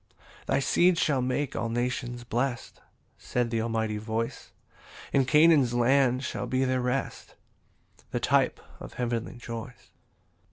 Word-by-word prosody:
4 - - +1
"Thy - - +3
seed 175 +5 +3
shall 140 -5 +1
make 130 +2 -1
all 115 +1 -2
nations 120 0 -2
blest," 120 +1 -3 0.4
(Said 120 -2 -2
the 115 -1 0
Almighty 110 -2 -1
voice) 110 +1 -4 0.6
"And 135 -2 +3
Canaan's 150 -5 +5
land 130 +1 +3
shall - - -4
be 130 +1 +1
their 130 0 0
rest, 125 +2 -3 0.7
"The - - -2
type - - +2 0.2
of - - -10
heavenly 120 -2 -3
joys." 120 0 -8
125 Hz, 135 wpm, -27 LUFS, 115-135 Hz, 0.7 s, Canaan's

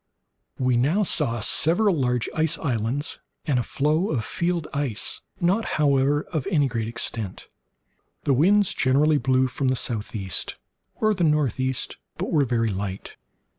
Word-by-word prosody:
We 125 -2 +1
now 155 - +2
saw 120 - +1
several 175 - +3
large 125 -4 0
ice 160 +1 +1
islands, 130 +2 -2 0.3
and 135 -5 +1
a - - +1
floe 155 - 0
of 120 -8 -1
field 170 -2 -1
ice, 140 -7 -1 0.2
not, 190 +6 +2
however, 145 0 +2
of 155 -5 -2
any 150 -7 +2
great 115 -3 -3
extent. 115 -3 -3 0.8
The 140 - +2
winds 190 +8 +4
generally 145 +3 +3
blew 130 +1 +2
from 130 +1 -2
the 130 - +2
southeast, 105 -6 -2 0.4
or 215 -1 +2
the 180 -3 -1
northeast, 130 -4 0 0.2
but - - -3
were 145 -3 +3
very 115 -2 0
light. 95 -1 -5
135 Hz, 145 wpm, -24 LUFS, 120-155 Hz, 0.8 s, winds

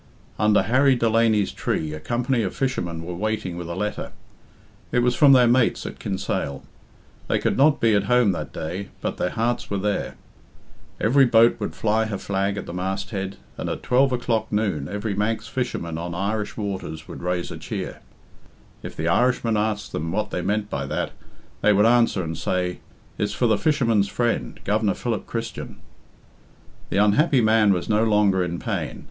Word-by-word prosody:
Under 105 0 +4
Harry 130 +3 +4
Delany's 115 -3 +2
tree 75 -1 -2
a 75 - -6
company 120 - 0
of 95 - -3
fishermen 85 -11 -2
were 90 - -5
waiting 105 -1 -2
with 85 -1 -6
a 85 - -4
letter. 105 +2 -3 0.8
It 125 - +2
was 125 0 +3
from 140 +2 +6
their 125 -2 +6
mates 120 0 +2
at - - -7
Kinsale. 70 -8 -3 0.6
They - - +2
could - - 0
not 145 +2 +4
be 115 -1 +3
at 100 -1 +2
home 125 -2 +4
that 75 -6 -4
day, 90 +5 -5
but - - -3
their 90 - 0
hearts 115 +5 -1
were 100 - -1
there. 100 +1 -2 0.8
Every 135 +5 +5
boat 115 -1 +5
would 105 - -4
fly 110 +1 +1
her 110 -2 -3
flag 100 +1 -1
at 100 - -4
the - - -7
masthead, 95 +1 -3 0.2
and - - -3
at - - -4
twelve 130 +2 +3
o'clock 120 -2 -1
noon 100 -10 0
every 105 +1 -3
Manx 110 +2 -1
fisherman 85 -10 -3
on 85 0 -5
Irish 105 +3 -2
waters 95 -6 -5
would - - -8
raise 90 0 -2
a - - -6
cheer. - - -5 0.8
If - - -8
the 80 - -2
Irishmen 120 +4 +2
asked 105 0 -1
them 80 +2 -3
what 105 +3 -2
they 90 - -2
meant 105 +3 -1
by - - -3
that, - - -2 0.5
they 105 - +5
would 105 +2 +4
answer 115 -5 +3
and 80 -1 -4
say, 90 +2 -2 0.4
"It's 105 - 0
for 125 - 0
the 110 -2 +4
fisherman's 115 -6 +2
friend, 120 +3 -1
Governor 105 -1 +1
Philip 120 -3 -3
Christian." 115 -1 -5 1.1
The - - -1
unhappy 125 +7 +4
man 110 -2 +4
was 90 -2 0
no 110 0 +2
longer 105 -4 +3
in 85 -1 -3
pain. - - -3
105 Hz, 180 wpm, -23 LUFS, 95-115 Hz, 1.1 s, from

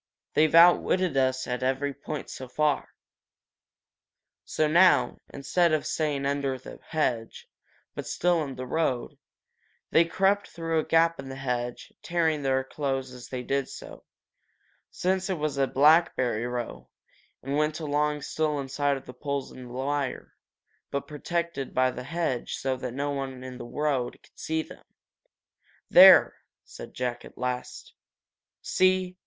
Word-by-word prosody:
They've 155 +1 +3
outwitted 175 0 +5
us 130 -1 +1
at 125 0 -3
every 135 +2 0
point 145 +2 -6
so 130 - -7
far." 150 +3 0 1.5
So 155 - 0
now, 175 +4 +4
instead 165 +4 +1
of 155 - 0
staying 145 -3 -1
under 140 -1 -1
the 130 - -11
hedge, 125 -8 -2 0.5
but - - -6
still 175 -2 +1
in 135 -3 -6
the 130 - -6
road, 130 -3 -2 0.7
they 170 - +5
crept 195 +4 +1
through 165 -1 -2
a - - -2
gap 165 0 +3
in 135 -1 -7
the 135 - -6
hedge, 125 -2 -4
tearing 160 -3 0
their 130 -1 +1
clothes 135 -1 -3
as 125 -1 -10
they 125 -1 -4
did 135 +1 -1
so, - - -10 0.9
since 190 +1 -1
it 185 - -1
was 150 -2 -2
a 135 - +3
blackberry 135 -6 +3
row, 120 -1 -5 0.5
and 135 +2 -2
went 150 +1 0
along 150 -1 -1
still 150 -1 -1
in 135 -1 -5
sight 140 +1 0
of 135 - -12
the 125 - -10
poles 140 +1 -4
and 130 - -10
the - - -10
wire, 135 +1 -3 0.6
but 140 - -3
protected 170 -1 -3
by 130 0 +3
the 125 - -8
hedge 155 -5 -2
so 135 -1 -1
that 125 -1 -6
no 145 +1 -1
one 135 -2 -5
in 130 -1 -8
the - - -7
road 135 -1 -1
could - - -22
see 160 0 -1
them. - - -14 1.1
"There!" - - +8 0.3
said - - -11
Jack, 125 -1 -3
at - - -14
last. 125 0 -5 0.7
"See? 185 -1 +1
140 Hz, 155 wpm, -27 LUFS, 130-160 Hz, 1.5 s, There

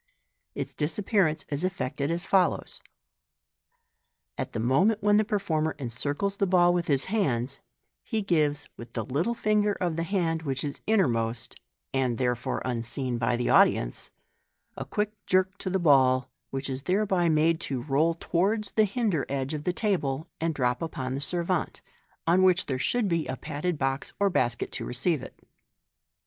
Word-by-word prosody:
Its - - -4
disappearance 160 0 0
is 145 +3 -2
effected 155 -6 -2
as 170 +2 -1
follows 190 -3 +1 0.8
:— - - -51
At - - -3
the - - -2
moment 185 - +2
when 205 0 +5
the 215 - +4
performer 185 -8 -1
encircles 145 - -2
the 200 - +1
ball 175 -1 +5
with 175 -1 -1
his 140 -2 +1
hands, 140 - -1 0.4
he 220 -3 -2
gives, 150 -6 +1
with 120 0 -10
the 115 - -3
little 165 - 0
finger 210 -2 +2
of 175 -4 -2
the - - 0
hand 165 -2 0
which 135 -4 -2
is 145 -1 -5
inner 215 -6 +4
most 115 0 -2 0.3
and 130 -3 +1
therefore 125 -2 -1
unseen 120 0 -2
by 120 +1 +1
the 120 0 0
audience - - +3 0.3
— - - -48
a - - -5
quick 210 0 -1 0.2
jerk 185 +1 +2
to 185 - -3
the 190 - +1
ball, 130 -6 +4 0.2
which 135 0 -3
is 135 -1 -4
thereby 185 +1 +1
made 160 +1 +3
to 135 -7 -3
roll 155 +4 +2
towards 195 +5 0
the 215 - +4
hinder 200 - 0
edge 135 +1 -2
of 150 -1 -4
the 180 - +2
table, 170 -8 -1
and 165 -1 -1
drop 125 -3 0
upon 130 -6 -3
the 135 - -3
se^vante, 175 +3 -1 0.4
on 175 +3 +4
which 185 0 +4
there 130 -2 -2
should 235 - +1
be 170 -3 0
a 130 - -3
padded 160 +3 -3
box 135 -1 -2
or 200 -1 +3
basket 120 -7 0
to - - -4
receive 145 +4 0
it. - - -12
160 Hz, 175 wpm, -27 LUFS, 135-190 Hz, 0.8 s, when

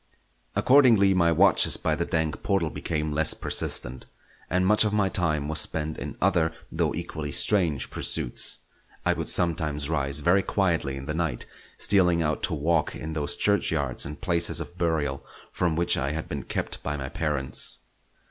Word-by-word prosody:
Accordingly 120 -8 +5
my 85 -2 +3
watches 80 - +4
by - - -1
the - - -1
dank 80 -2 -1
portal 90 -5 0
became 75 -2 -3
less 80 +1 +2
persistent, 65 +1 -1 0.4
and 90 +2 +1
much 105 +3 +5
of 105 -1 0
my 105 -2 +2
time 75 -6 0
was 80 0 0
spent 80 0 -3
in - - -6
other 80 -2 +1 0.2
though - - 0
equally 80 -4 -5
strange 85 -6 +1
pursuits. - - 0 0.4
I - - +3
would - - -5
sometimes 80 -3 0
rise 70 -3 0
very 90 +6 +4
quietly 85 -9 0
in 70 - -7
the 75 - -3
night, 80 -6 -2 0.3
stealing 90 -4 +3
out 75 -1 -1
to - - -2
walk 80 +1 0
in 80 +1 -6
those 75 -2 -2
churchyards 80 -10 +1
and 75 +1 -5
places 85 -3 0
of 85 - -7
burial 80 -6 -1 0.3
from 85 -3 0
which 85 +1 +2
I 70 +2 -1
had 80 0 -4
been - - -5
kept - - -4
by 75 +1 -3
my 65 -1 -5
parents. 70 -5 0
80 Hz, 170 wpm, -26 LUFS, 75-90 Hz, 0.4 s, Accordingly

